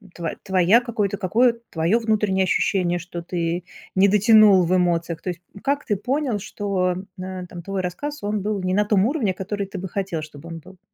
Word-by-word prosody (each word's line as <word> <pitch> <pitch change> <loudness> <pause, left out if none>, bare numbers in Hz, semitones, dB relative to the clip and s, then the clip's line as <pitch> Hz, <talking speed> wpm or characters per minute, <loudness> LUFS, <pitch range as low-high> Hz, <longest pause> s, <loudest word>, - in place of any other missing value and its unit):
тво 170 -2 -3
твоя 190 +5 +4
какое-то, 210 -4 -2
какое 230 +4 +2
твое 170 +8 +1
внутреннее 210 -4 +1
ощущение, 180 -1 +1
что 175 0 -7
ты 170 0 -2 0.3
не 190 +1 +5
дотянул 210 -2 +6
в 180 - +2
эмоциях? 170 -2 0
То - - -4
есть, 175 -1 -5
м, 200 - -12
как 285 +1 -1
ты 210 - 0
понял, 250 +2 -1
что, 195 -3 -1 0.3
э, 185 -1 -6
там, 175 0 -9
твой 195 +2 -3
рассказ, 290 +12 -5
он 205 0 -1
был 205 -1 -2
не 185 0 0
на 210 +2 +2
том 205 -2 +3
уровне, 235 - 0
который 200 +1 -4
ты 195 - -7
бы 190 +1 -5
хотел, 185 -4 -3
чтобы 150 +2 -11
он 165 - -6
был? 185 +3 -16
190 Hz, 205 wpm, -23 LUFS, 180-210 Hz, 0.3 s, дотянул